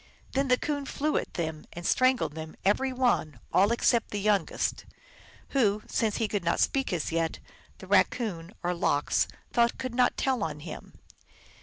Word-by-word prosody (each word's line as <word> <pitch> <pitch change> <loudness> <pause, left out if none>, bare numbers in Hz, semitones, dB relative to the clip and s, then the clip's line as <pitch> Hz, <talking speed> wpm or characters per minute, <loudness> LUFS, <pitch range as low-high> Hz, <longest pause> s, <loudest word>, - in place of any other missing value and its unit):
Then 275 +1 +1
the 250 -1 +4
Coon 285 -1 -3
flew 300 +2 -1
at - - -4
them 160 -2 -4
and 175 0 -7
strangled 255 - +3
them 160 0 -7
every 260 +7 +2
one, 245 - +1
all 200 +4 +5
except 235 -1 +2
the 205 - -3
youngest, 205 0 0 0.6
who, 215 -6 +2
since 220 -2 0
he 225 - 0
could 205 -3 -2
not 170 0 +1
speak 270 -1 +1
as 170 -4 -1
yet, 165 0 0 0.4
the - - -11
Raccoon, 180 -8 +1
or 175 +1 +1
Lox, 145 -4 +1 0.3
thought 235 -1 +3
could 255 -2 -4
not 250 0 +2
tell 260 -4 +1
of 150 -2 -4
him. 155 0 -9
210 Hz, 170 wpm, -28 LUFS, 165-255 Hz, 0.6 s, all